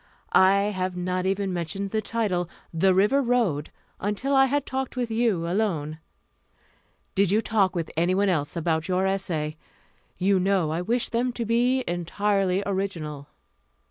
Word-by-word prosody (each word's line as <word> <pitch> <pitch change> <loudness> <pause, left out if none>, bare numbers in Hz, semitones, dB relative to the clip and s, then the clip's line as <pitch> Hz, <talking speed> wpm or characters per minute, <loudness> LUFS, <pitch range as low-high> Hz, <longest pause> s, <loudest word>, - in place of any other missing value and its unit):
I 190 +1 +6 0.2
have 185 -1 -2
not 180 +1 -1
even 195 0 -1
mentioned 180 +3 -3
the 220 - 0
title, 200 -6 -1 0.2
The 190 +4 +3
River 210 +9 +4
Road, 230 - +1 0.3
until 210 +8 -1
I 270 0 +6
had 285 +1 0
talked 265 0 -3
with 245 -2 -2
you 220 -7 +1
alone. 170 -6 -1 1.1
Did 195 -1 +2
you 210 +3 +3
talk 205 -5 +1
with 165 -2 -3
anyone 185 +5 +2
else 155 -5 0
about 160 -1 0
your 185 0 +1
essay? 165 -6 -2 0.6
You 190 +1 +2
know 185 -4 +1
I 165 +2 -1
wished 235 +6 -1
them 245 +2 0
to 235 -1 -3
be 245 +3 +2
entirely 190 +2 0
original." 165 -8 -3
195 Hz, 150 wpm, -25 LUFS, 175-220 Hz, 1.1 s, I